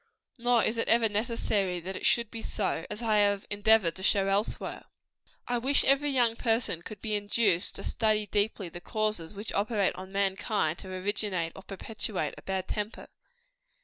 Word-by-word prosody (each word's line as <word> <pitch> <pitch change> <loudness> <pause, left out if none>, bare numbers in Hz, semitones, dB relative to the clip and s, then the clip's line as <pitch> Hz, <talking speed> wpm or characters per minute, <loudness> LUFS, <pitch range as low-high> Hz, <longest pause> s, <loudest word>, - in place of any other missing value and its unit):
Nor 240 -1 +3
is 225 +1 0
it - - 0
ever 230 0 +5
necessary 210 -4 0
that 185 +3 -6
it - - 0
should 235 -2 +2
be 225 - -6
so, 190 -7 -2
as 210 +3 -6
I 215 -2 +2
have 200 -1 +2
endeavored 205 -4 +4
to - - -7
show 195 0 +3
elsewhere. 200 +2 -1 0.6
I 245 0 0
wish 270 +4 +2
every 280 +2 +3
young 240 -4 +3
person 225 -8 +1
could 210 +3 -9
be 215 -2 -2
induced 205 -3 +2
to - - -8
study 215 -2 +1
deeply 205 -1 0
the 175 +1 -9
causes 215 -5 -1
which 205 +3 -6
operate 205 -1 +1
on 185 +1 -9
mankind 195 -3 0
to - - -8
originate 185 -3 -1
or - - -9
perpetuate 195 -4 -4
a - - -12
bad 190 -1 -3
temper. 210 +1 -4
210 Hz, 180 wpm, -29 LUFS, 190-225 Hz, 0.6 s, ever